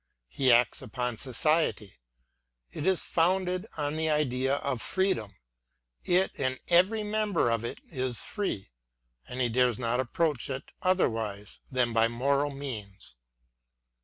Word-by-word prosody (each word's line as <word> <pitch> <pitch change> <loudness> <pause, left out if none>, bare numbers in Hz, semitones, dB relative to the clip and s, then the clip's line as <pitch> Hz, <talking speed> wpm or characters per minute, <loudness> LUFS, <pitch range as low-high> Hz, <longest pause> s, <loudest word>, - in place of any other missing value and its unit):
He 130 - +2
acts 120 +1 +4
upon 125 -1 -3
society; 130 - 0 0.3
— - - -50 0.3
it 150 - -4
is 190 -2 +3
founded 185 +3 +1
on 145 0 -2
the 160 0 0
idea 135 -3 +1
of 140 -4 -2
freedom: 115 - +1 0.7
it 180 +2 +2
and 130 -1 -1
every 185 +6 +4
member 210 - +1
of 115 -1 0
it 120 - -4
is 130 -5 -2
free; 190 - -4 0.3
— - - -40
and 125 - -5
he 125 - +3
dares 120 -1 +2
not 120 0 -1
approach 145 +2 0
it 135 0 -5
otherwise 110 - 0
than 125 -3 +1
by 115 0 +4
moral 140 +5 +1
means. 120 - -7
130 Hz, 140 wpm, -29 LUFS, 115-165 Hz, 0.7 s, acts